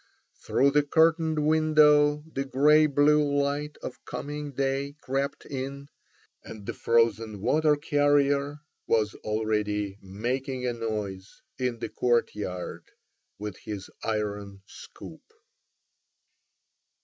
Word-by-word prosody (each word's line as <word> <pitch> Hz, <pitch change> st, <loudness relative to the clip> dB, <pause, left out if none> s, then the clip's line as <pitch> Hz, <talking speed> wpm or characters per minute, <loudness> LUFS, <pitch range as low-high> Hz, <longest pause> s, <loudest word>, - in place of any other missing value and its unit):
Through 140 Hz, +1 st, +1 dB
the 150 Hz, +1 st, +4 dB
curtained 160 Hz, +1 st, +2 dB
window 150 Hz, -1 st, +4 dB
the 135 Hz, -, -1 dB
grey 150 Hz, +3 st, +4 dB
blue 150 Hz, +1 st, +4 dB
light 145 Hz, +1 st, -1 dB
of 125 Hz, -, -7 dB
coming 145 Hz, 0 st, -5 dB
day 135 Hz, +1 st, -2 dB
crept 135 Hz, +1 st, -3 dB
in, 140 Hz, +1 st, -6 dB, 0.5 s
and 105 Hz, -2 st, -10 dB
the -, -, -4 dB
frozen 115 Hz, -2 st, +1 dB
water 150 Hz, +8 st, +3 dB
carrier 145 Hz, -1 st, +1 dB, 0.3 s
was 110 Hz, -2 st, +2 dB
already 105 Hz, -2 st, -1 dB
making 125 Hz, +7 st, -3 dB
a 125 Hz, -, 0 dB
noise 105 Hz, -4 st, -5 dB, 0.2 s
in 125 Hz, -2 st, -1 dB
the -, -, -5 dB
courtyard 105 Hz, -7 st, -1 dB, 0.5 s
with 105 Hz, -2 st, -6 dB
his 105 Hz, -3 st, -7 dB
iron 105 Hz, -3 st, -3 dB
scoop. -, -, -12 dB
135 Hz, 105 wpm, -27 LUFS, 110-145 Hz, 0.5 s, the